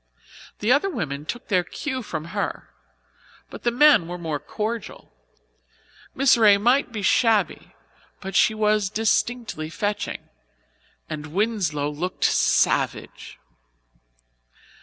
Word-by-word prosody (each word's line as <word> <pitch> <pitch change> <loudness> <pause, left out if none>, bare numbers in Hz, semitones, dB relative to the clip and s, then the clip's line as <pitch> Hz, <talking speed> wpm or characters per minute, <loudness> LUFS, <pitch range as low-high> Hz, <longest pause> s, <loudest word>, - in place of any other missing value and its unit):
The 215 +4 +2
other 290 +9 +3
women 150 - -4
took 240 - -6
their 185 -3 +2
cue 260 - -5
from 160 -8 -5
her, - - -3 0.8
but - - -9
the 240 - +1
men 250 - +5
were 175 +1 -5
more 160 -4 -3
cordial. 220 +8 -6 1.0
Miss 275 0 +5
Ray 210 -3 +6
might 245 +5 +2
be 215 -3 -5
shabby, 225 +1 +1 0.4
but 195 -1 -7
she 220 - +4
was 210 -2 +1
distinctly 220 -5 -1
fetching, 205 +6 -3 0.8
and 155 -1 -6
Winslow 170 -6 -1
looked 175 +5 -4
savage. - - +1
210 Hz, 115 wpm, -23 LUFS, 170-235 Hz, 1.0 s, Ray